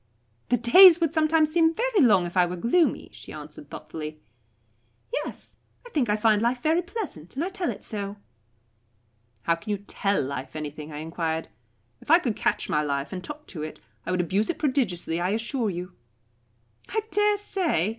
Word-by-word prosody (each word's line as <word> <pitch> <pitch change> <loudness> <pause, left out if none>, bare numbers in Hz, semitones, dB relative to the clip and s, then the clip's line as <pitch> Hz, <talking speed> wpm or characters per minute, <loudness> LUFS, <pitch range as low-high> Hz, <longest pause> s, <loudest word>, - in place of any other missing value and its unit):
"The 245 - +3
days 335 - +8
would 325 -2 +1
sometimes 310 -1 +3
seem 325 0 +3
very 470 -4 +2
long 200 -9 +5
if 175 - -7
I 180 -1 +4
were 180 - -4
gloomy," 245 - +1
she - - -12
answered - - -10
thoughtfully. 155 -1 -7 0.9
"Yes, - - -5 0.3
I 485 - -12
think 260 - 0
I 210 - +3
find 215 -1 +3
life 245 +2 0
very 320 +3 +3
pleasant, 345 - -7
and 300 +5 -1
I - - -2
tell 380 -3 -2
it - - -6
so." 205 -2 -4 1.3
"How 170 - +3
can 165 +6 -8
you 205 - +1
'tell 200 0 -1
life' 135 +1 -5
anything?" 150 0 -6
I 150 - -7
enquired. 160 +1 -3 0.5
"If - - -17
I 330 - +8
could 245 -11 -2
catch - - 0
my 150 - +1
life 140 0 -2
and 185 -1 -5
talk 300 0 -8
to 160 - -4
it, 155 0 -6 0.2
I - - -7
would 180 0 +1
abuse 195 +5 0
it 345 - -1
prodigiously, 220 - 0
I 180 - +1
assure 235 0 -1
you." 180 0 -5 1.0
"I 440 - 0
dare 415 0 +3
say. 355 - 0
215 Hz, 185 wpm, -26 LUFS, -, 1.3 s, days